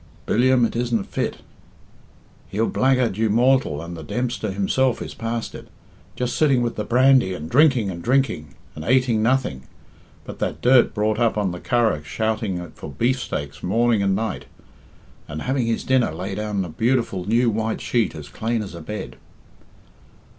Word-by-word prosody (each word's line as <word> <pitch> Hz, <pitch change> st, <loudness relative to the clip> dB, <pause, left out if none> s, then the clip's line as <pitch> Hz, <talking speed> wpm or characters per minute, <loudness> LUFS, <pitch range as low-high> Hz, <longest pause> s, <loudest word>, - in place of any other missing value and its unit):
"Billiam? 125 Hz, +1 st, +3 dB
It 115 Hz, -, -3 dB
isn't 120 Hz, -3 st, 0 dB
fit. -, -, -3 dB, 1.1 s
He'll 110 Hz, +3 st, 0 dB
blackguard 130 Hz, -6 st, +1 dB
you 110 Hz, 0 st, +1 dB
mortal, 120 Hz, -, +2 dB
and 85 Hz, +1 st, -7 dB
the 80 Hz, -, -8 dB
Dempster 120 Hz, +6 st, -3 dB
himself 105 Hz, +6 st, +1 dB
is -, -, -6 dB
past 115 Hz, 0 st, -4 dB
it. -, -, -10 dB, 0.5 s
Just 125 Hz, -1 st, -2 dB
sitting 135 Hz, -5 st, +3 dB
with 120 Hz, -, -2 dB
the 105 Hz, -, -2 dB
brandy 125 Hz, -3 st, +4 dB
and 80 Hz, -2 st, -6 dB
drinking 125 Hz, -, +3 dB
and 85 Hz, -1 st, -7 dB
drinking, 120 Hz, -, 0 dB, 0.2 s
and 75 Hz, -, -8 dB
ateing 125 Hz, -1 st, +2 dB
nothing; 115 Hz, -, 0 dB, 0.6 s
but -, -, -9 dB
that -, -, -2 dB
dirt 125 Hz, 0 st, +4 dB
brought 105 Hz, 0 st, 0 dB
up 115 Hz, -2 st, +2 dB
on 100 Hz, -3 st, 0 dB
the 90 Hz, -, -6 dB
Curragh 115 Hz, -10 st, +1 dB
shouting 105 Hz, -2 st, -2 dB
for -, -, -9 dB
beefstakes 75 Hz, -, -2 dB
morning 115 Hz, +3 st, +2 dB
and 95 Hz, -1 st, +2 dB
night, 110 Hz, 0 st, -3 dB, 0.8 s
and 75 Hz, 0 st, -6 dB
having 130 Hz, -2 st, 0 dB
his 115 Hz, -, -1 dB
dinner 130 Hz, -2 st, +2 dB
laid 95 Hz, +5 st, -5 dB
on 105 Hz, -3 st, -2 dB
a -, -, -7 dB
beautiful 115 Hz, -1 st, 0 dB
new 115 Hz, +2 st, +3 dB
white 110 Hz, +1 st, -2 dB
sheet 120 Hz, -3 st, 0 dB
as 75 Hz, -2 st, -8 dB
clane 115 Hz, +7 st, -2 dB
as 95 Hz, -, -8 dB
a 85 Hz, -, -8 dB
bed." 75 Hz, -9 st, -6 dB
110 Hz, 170 wpm, -22 LUFS, 95-125 Hz, 1.1 s, brandy